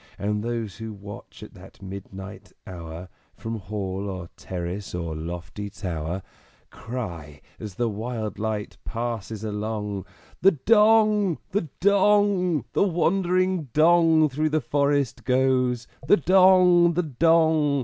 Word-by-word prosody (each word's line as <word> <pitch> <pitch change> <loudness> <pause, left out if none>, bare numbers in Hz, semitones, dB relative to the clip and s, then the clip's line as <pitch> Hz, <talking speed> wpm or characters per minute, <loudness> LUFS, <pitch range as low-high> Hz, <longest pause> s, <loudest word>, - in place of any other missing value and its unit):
And 105 +1 -2
those 115 -6 -4
who 110 -1 -6
watch 100 0 -11
at - - -11
that - - -15
midnight 95 0 -9
hour 85 -1 -8 0.3
From 115 0 -5
Hall 100 0 -4
or 90 -3 -6
Terrace 90 +2 -5
or 85 -2 -4
lofty 85 +5 -6
Tower, 85 -2 -4 0.5
Cry, 85 - -7 0.2
as 105 -4 -8
the 120 +2 0
wild 110 0 -4
light 110 -1 -3
passes 115 -2 -4
along, 105 -2 -4 0.3
"The 195 +1 +6
Dong! 210 - +4
the 185 -5 -1
Dong! 200 - +3
The - - +1
wandering 185 -1 +1
Dong 160 0 +5
through 155 +3 -1
the 155 +1 +1
forest 140 -4 0
goes! 125 -1 +1 0.2
The 205 - +6
Dong! 180 0 +5
the 180 +2 0
Dong! 160 -1 +3
120 Hz, 125 wpm, -24 LUFS, 100-165 Hz, 0.5 s, The